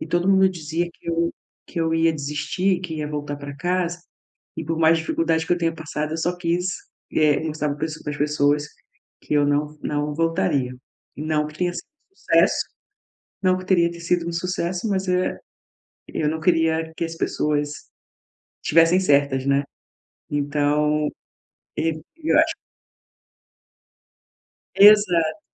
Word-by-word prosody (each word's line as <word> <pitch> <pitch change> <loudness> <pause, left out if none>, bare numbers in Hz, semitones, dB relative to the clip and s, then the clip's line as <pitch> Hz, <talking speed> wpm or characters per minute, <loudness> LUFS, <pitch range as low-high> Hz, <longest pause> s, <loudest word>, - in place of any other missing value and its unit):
e - - -5
todo 175 +3 0
mundo 190 -1 +5
dizia 170 -1 -3
que - - -13
eu 170 0 0 0.4
que 170 - -3
eu 160 0 +1
ia 165 0 +3
desistir, 150 +6 -1
que 170 -4 -5
ia 150 -1 -3
voltar 145 -1 -4
pra 140 0 -8
casa 175 +1 -1 0.6
e 160 - -4
por 165 +1 -2
mais 165 0 +5
dificuldade 160 0 0
que - - +1
eu 175 - +1
tenha 165 -1 0
passado, 155 -1 -4
eu - - -2
só 175 +2 0
quis, 175 0 -1 0.5
eh, 150 -2 +3
mostrar 150 -2 -2
para 150 - -3
as 155 0 -8
para 150 - -4
as - - -6
pessoas 145 0 +2 0.6
que - - -3
eu 145 -1 +4
não 150 +1 0
não 150 0 -2
voltaria. 165 -5 0 0.4
Não 150 0 0
que 150 0 -12
tenha 175 -1 0
sido - - -6 0.3
um - - -37
sucesso, - - +2 0.8
não 185 -1 +3
que 185 - -8
teria 170 -3 +3
sido 170 0 0
um - - -2
sucesso, 180 +3 -2
mas, 190 -1 -1
eh, 180 0 0 0.7
eu 150 -1 -1
não 160 0 -3
queria 160 -1 +1
que 170 - -1
as 165 0 -6
pessoas 150 -2 0 0.9
tivessem 165 +3 +4
certas, 140 -5 +2
né? 140 0 +3 0.7
Então, 150 +1 +1 0.7
e 160 0 0 0.2
eu 320 0 +2
acho - - +2 2.2
Exato. 200 - +6
160 Hz, 155 wpm, -23 LUFS, 150-175 Hz, 2.2 s, Exato